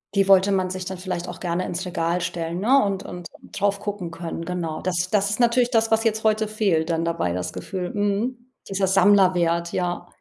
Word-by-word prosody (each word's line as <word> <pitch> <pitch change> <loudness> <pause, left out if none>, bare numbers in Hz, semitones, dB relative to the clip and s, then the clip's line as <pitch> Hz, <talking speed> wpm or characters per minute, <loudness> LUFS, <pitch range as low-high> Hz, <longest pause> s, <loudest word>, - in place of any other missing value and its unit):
Die 195 -1 +3
wollte 195 +1 +5
man 185 -1 0
sich 185 -1 -5
dann 190 0 -5
vielleicht 180 -1 -4
auch 175 - -7
gerne 175 0 -2
ins 180 +2 -4
Regal 170 0 -1
stellen, 170 0 -3
ne? 265 +7 +4
Und 195 -1 -2
und 175 -1 -8 0.2
drauf 200 0 0
gucken 200 -5 -4
können. 165 0 -6
Genau. 165 -3 -4
Das 180 0 -1
das 200 -1 +2
ist 210 - -2
natürlich 240 0 +3
das, 225 -2 +2
was 220 +1 +3
jetzt 220 -1 0
heute 215 0 +2
fehlt 195 -7 0
dann 165 0 0
dabei, 165 - -1
das 90 0 -3
Gefühl, 185 -3 -5
mhm, 230 +5 -2 0.2
dieser 195 -1 0
Sammlerwert, 180 -3 +3
ja. 175 -1 -2
185 Hz, 205 wpm, -23 LUFS, 170-205 Hz, 0.2 s, wollte